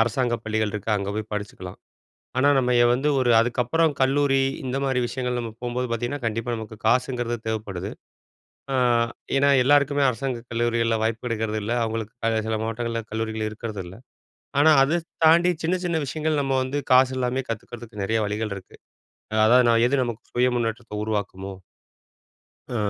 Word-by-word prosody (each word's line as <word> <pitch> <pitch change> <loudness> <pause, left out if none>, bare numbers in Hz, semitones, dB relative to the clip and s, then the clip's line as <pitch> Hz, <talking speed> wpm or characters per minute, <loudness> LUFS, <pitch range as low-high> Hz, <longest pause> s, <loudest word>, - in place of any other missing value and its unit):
அரசாங்க 120 +2 +1
பள்ளிகள் 110 -1 -1
இருக்கு, 105 +1 -4
அங்க 100 -1 -3
போய் 110 0 -5
படிச்சுக்கலாம். 105 -3 -6 0.6
ஆனா, 140 - +4
நம்ம 125 -1 +1
ய 120 - +6
வந்து 135 +4 +1
ஒரு 125 -2 +2
அதுக்கப்புறம் 125 +7 +1
கல்லூரி, 135 0 +3 0.2
இந்த 130 0 -2
மாதிரி 130 -2 +1
விஷயங்கள் 125 0 -3
நம்ம 115 -1 -5
போம்போது 125 +1 -2
பார்த்தீங்கன்னா, 120 +4 -3
கண்டிப்பா 115 +2 -2
நமக்கு 110 -1 -8
காசுங்கிறது 120 0 +1
தேவைப்படுது. 100 -4 -4 0.8
அ - - +1 0.6
ஏன்னா, 140 +1 +4
எல்லாருக்குமே 145 +1 +3
அரசாங்க 125 -1 -3
கல்லூரிகள்ல 115 -1 +1
வாய்ப்பு 115 +2 -1
இருக்கிறதில்ல. 110 0 -2
அவங்களுக்கு 110 -1 -3
க 115 - +2
சில 110 0 0
மாவட்டங்கள்ல 115 +1 -3
கல்லூரிகள் 110 0 -2
இருக்கிறதில்ல. 105 -5 -7 0.7
ஆனா, 155 +2 +6
அத 155 +6 +2
ஸ் 165 - -36 0.2
தாண்டி 170 +3 +6
சின்ன 175 +3 +2
சின்ன 170 -2 0
விஷயங்கள் 155 +2 -1
நம்ம 135 -1 -1
வந்து, 140 +3 -2
காசு 130 0 +5
இல்லாம 130 +1 -1
கத்துக்கிறதுக்கு 115 -1 -6
நெறைய 110 +3 +1
வழிகள் 105 0 -2
இருக்கு. 95 - -12 0.7
அதாவது 125 +2 +6
நான் 115 0 +4
எது 140 - +1
நமக்கு 115 -2 -5
சுய 125 +1 +3
முன்னேற்றத்த 115 -1 -3
உருவாக்குமோ 100 -2 -3 1.2
அ - - 0
120 Hz, 155 wpm, -24 LUFS, 110-130 Hz, 1.2 s, ய